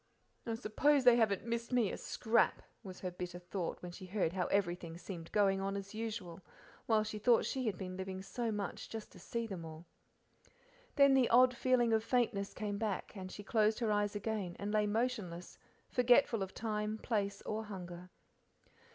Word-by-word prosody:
"I 225 - -1
suppose 270 +5 +2
they 245 -1 +8
haven't 215 -4 +2
missed 235 +1 -3
me 240 -5 +2
a - - -3
scrap," 230 0 +1 0.2
was 190 -5 -9
her 185 - -3
bitter 175 0 -6
thought, 175 0 -4
when 180 - -6
she 185 +1 -9
heard 180 -3 0
how 185 -2 0
everything 175 -4 -1
seemed 170 -2 -8
going 195 -2 +3
on 195 +1 -1
as 200 +1 -7
usual, 215 -6 -5 0.5
while 220 -2 +4
she 230 +4 +1
had 200 -4 -1
been 185 -1 -6
living 190 0 -4
through 235 +5 -4
so - - 0
much 205 -3 -4
just 220 -1 -7
to - - -14
see 230 0 -3
them 190 -6 -6
all. 160 +1 -9 1.1
Then 280 -1 +6
the 260 -3 +4
odd 250 +1 +6
feeling 240 -2 +3
of 220 0 +3
faintness 230 -5 +1
came 205 -2 -3
back, 215 -2 -3
and 185 -2 -7
she 205 - -8
closed 215 +1 +2
her 230 -3 0
eyes 205 0 +1
again 205 -4 -3
and 205 +1 -3
lay 210 -1 +3
motionless, 205 -6 -2 0.3
forgetful 245 -2 +4
of 190 0 -4
time, 215 -1 -2
place, 205 -3 -2
or 220 +1 -3
hunger. 180 -3 -8
210 Hz, 185 wpm, -35 LUFS, 190-230 Hz, 1.1 s, they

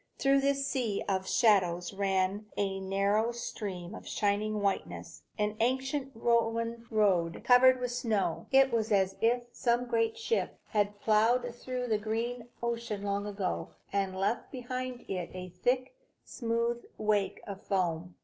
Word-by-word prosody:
Through 275 0 +4
this 275 0 +1
sea 240 -7 -1
of 190 -1 -1
shadows 180 -5 +3
ran 195 +1 0
a 195 -1 0
narrow 200 +4 +1
stream 200 -6 -5
of - - -9
shining 210 +1 0
whiteness, 200 -1 -2 0.2
an 210 0 0
ancient 265 +3 0
Roman 230 0 0
road, 190 -7 +2
covered 255 +1 +6
with 250 -1 -2
snow. 215 -8 -1
It 270 -1 +5
was 225 -1 0
as 195 -1 +3
if 240 +2 +3
some 240 0 +1
great 230 - 0
ship 460 +1 -1
had 205 -1 0
ploughed 235 +3 +3
through 250 +1 -4
the 220 -3 +1
green 230 +3 -3 0.2
ocean 235 -3 -2
long 200 0 -1
ago, 195 -3 -3 0.2
and 195 -1 0
left 200 +5 -1
behind 255 -1 -5
it 180 -3 -3
a 185 0 -6
thick, 255 - +1 0.3
smooth 235 0 -1
wake 210 -2 +1
of 200 -1 -7
foam. 180 -4 -1
220 Hz, 145 wpm, -31 LUFS, 195-245 Hz, 0.3 s, covered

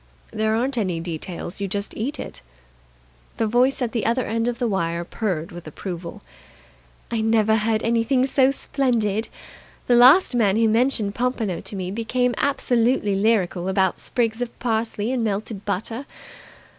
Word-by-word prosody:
"There 220 0 0
aren't 250 +2 0
any 185 -6 -1
details. 170 +3 -5
You 200 - -1
just 200 +2 -2
eat 270 +8 -3
it." - - -7 1.0
The 225 - +1
voice 250 +4 +2
at 235 - -2
the 230 -2 -1
other 240 +2 +1
end 230 +1 -1
of 240 -1 -1
the 240 - 0
wire 170 -4 -1
purred 180 -4 -3
with 175 -2 -10
approval. 175 +4 -7 0.9
"I 230 -2 0
never 220 -1 +3
heard 215 0 0
anything 235 +3 +2
so 265 -1 +3
splendid. 235 -6 0 0.6
The 245 - +3
last 260 +8 +7
man 215 -4 +2
who 225 0 +4
mentioned 225 -2 +1
pompano 230 -6 -1
to - - -7
me 185 -1 -4
became 245 +3 0
absolutely 245 -5 +1
lyrical 195 -3 +1
about 190 -1 +1
sprigs 230 -1 -1
of 245 - -4
parsley 225 -1 -1
and 255 -3 0
melted 210 -1 -3
butter. 225 +7 -3
220 Hz, 155 wpm, -23 LUFS, 200-245 Hz, 1.0 s, last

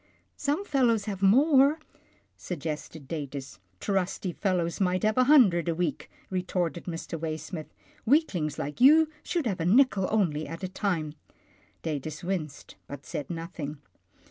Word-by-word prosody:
" - - -44
Some 295 +7 -1
fellows 240 - +2
have 195 -3 -4
more," 275 +8 +5 0.6
suggested 155 -3 -6
Datus. 140 - -6
" 90 0 -40
Trusty 190 -1 -1
fellows 175 -1 -1
might 185 -1 +1
have 215 0 +2
a 255 - +4
hundred 200 - +5
a 165 - 0
week," 165 -5 -2 0.2
retorted 180 -3 -2
Mr. 165 -1 -5
Waysmith. 155 0 -5 0.2
" - - -31
Weaklings 200 - +2
like 145 +10 -5
you 310 +4 +7
should 340 -5 -2
have 195 -6 -1
a 165 - -1
nickel 205 -1 +4
only 165 -8 0
at 165 +5 -8
a - - -1
time." 180 -6 -2 0.7
Datus 155 0 -4
winced, 170 -6 -4
but 140 0 -9
said 145 - -5
nothing. 165 -3 -5
180 Hz, 150 wpm, -28 LUFS, 155-215 Hz, 0.7 s, you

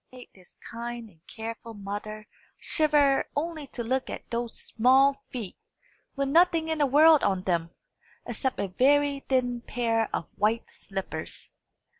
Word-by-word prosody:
It - - -15
made 250 - -12
this 185 -2 -16
kind 235 -1 -7
and 165 0 -29
careful 225 0 -7
mother 205 +1 -6 0.3
shiver 295 -3 +2
only 310 -1 -3
to 240 - -5
look 260 +3 -1
at - - -7
those 235 0 -3
small 265 +4 +3
feet, 225 -7 -6 0.6
with 275 0 -1
nothing 330 +1 +4
in 320 -1 -1
the 290 - +3
world 305 +3 +6
on 190 -2 0
them, 170 -3 0 0.6
except 265 -2 -2
a 200 - 0
very 280 +7 +3
thin 245 -2 +1
pair 230 -2 0
of 165 - -4
white 220 +3 +1
slippers. 190 -5 -6
240 Hz, 150 wpm, -27 LUFS, 215-280 Hz, 0.6 s, world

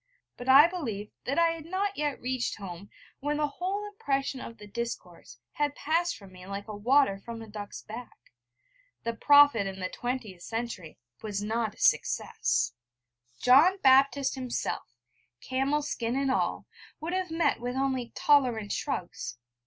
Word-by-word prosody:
But 245 +1 -6
I 275 +3 +10
believe 230 - -5
that 275 - -1
I 335 0 +5
had 330 -1 -5
not 390 +3 -1
yet 295 -4 -1
reached 255 -1 -2
home, 195 -1 -8 0.3
when 295 +1 -1
the 300 - +2
whole 380 +7 -3
impression 275 -9 -2
of 230 - -8
the 210 - -11
discourse 195 - -6
had 290 -1 -1
passed 340 +3 0
from 195 -2 -14
me 180 0 -13
like 200 +1 -5
water 215 0 +2
from 235 -1 -7
a - - -11
duck's 205 -1 -8
back. 235 +3 -9 0.9
The 230 - -1
Prophet 285 -4 +6
in 195 0 -6
the 185 -1 -2
twentieth 240 -8 -4
century 225 -7 -5 0.2
was 205 -2 -3
not 220 0 -1
a - - -20
success. 120 - +1 0.7
John 305 +10 +7
Baptist 270 +1 +5
himself, 255 -3 -3 0.5
camel 270 +3 0
skin 240 -4 -2
and 275 -1 +1
all, - - 0 0.3
would, 335 +3 -4
have 370 -1 -1
met 325 -5 +1
with 245 +1 -3
only 265 -2 -1
tolerant 245 -8 +3
shrugs. 180 - -3
255 Hz, 155 wpm, -29 LUFS, 215-290 Hz, 0.9 s, I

